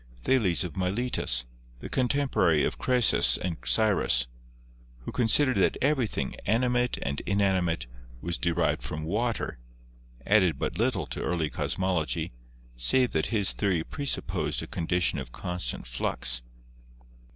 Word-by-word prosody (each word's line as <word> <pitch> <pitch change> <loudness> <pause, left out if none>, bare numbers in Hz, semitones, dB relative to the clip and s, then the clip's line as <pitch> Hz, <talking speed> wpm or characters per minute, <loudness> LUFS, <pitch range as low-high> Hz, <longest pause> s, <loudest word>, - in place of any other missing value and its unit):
Thales 100 - +2
of 85 -4 -6
Miletus, 95 - 0 0.3
the - - -8
contemporary 125 - +1
of - - -2
Croesus 125 -2 +4
and 90 -2 -3
Cyrus, 100 - +3 0.8
who - - -7
considered 130 +3 +3
that - - +2
everything, 125 - 0
animate 125 +3 +1
and 70 0 -2
in 100 +1 +1
animate, 90 -8 +1 0.3
was 85 +4 -3
derived 85 -1 0
from 75 0 -5
water, 110 - -2 0.7
added 95 -8 +3
but - - -3
little 115 - 0
to - - -6
early 80 -4 -1
cosmology, 90 -9 -1 0.4
save 90 - +2
that 80 - 0
his 105 -4 +2
theory 95 -6 0
presupposed 140 - -2
a - - -5
condition 85 -2 0
of 60 -2 -8
constant 90 -2 -3
flux. - - 0
95 Hz, 130 wpm, -27 LUFS, 80-120 Hz, 0.8 s, Croesus